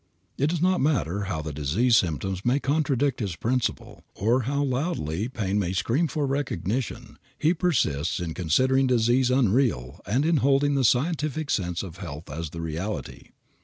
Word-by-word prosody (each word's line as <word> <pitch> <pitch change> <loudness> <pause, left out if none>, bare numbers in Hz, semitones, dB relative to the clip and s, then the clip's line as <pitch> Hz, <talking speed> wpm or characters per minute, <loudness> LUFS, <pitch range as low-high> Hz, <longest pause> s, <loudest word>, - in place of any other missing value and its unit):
It 140 - +1
does 170 0 -1
not 185 0 +3
matter 105 - 0
how 85 -6 -3
the 75 -1 -5
disease 85 - +2
symptoms 95 +1 0
may 125 +4 +2
contradict 140 -2 0
this 100 -7 -3
principle, 120 +7 -2
or 115 +6 +2
how 140 0 0
loudly 125 - -2
pain 105 -5 -1
may 90 -2 -1
scream 115 - +1
for 150 -1 -1
recognition, 135 - -3 0.2
he 160 +3 +2
persists 120 - 0
in 85 -2 -3
considering 130 - +2
disease 125 +1 +3
unreal 120 - +1
and 125 +8 +1
in 165 -1 +3
holding 140 +1 +3
the 135 -1 +1
scientific 150 +3 +1
sense 90 -3 -1
of 90 -2 -8
health 85 -4 -8
as 80 +1 -4
the 85 +2 -7
reality. 80 - -5
120 Hz, 165 wpm, -26 LUFS, 90-140 Hz, 0.2 s, not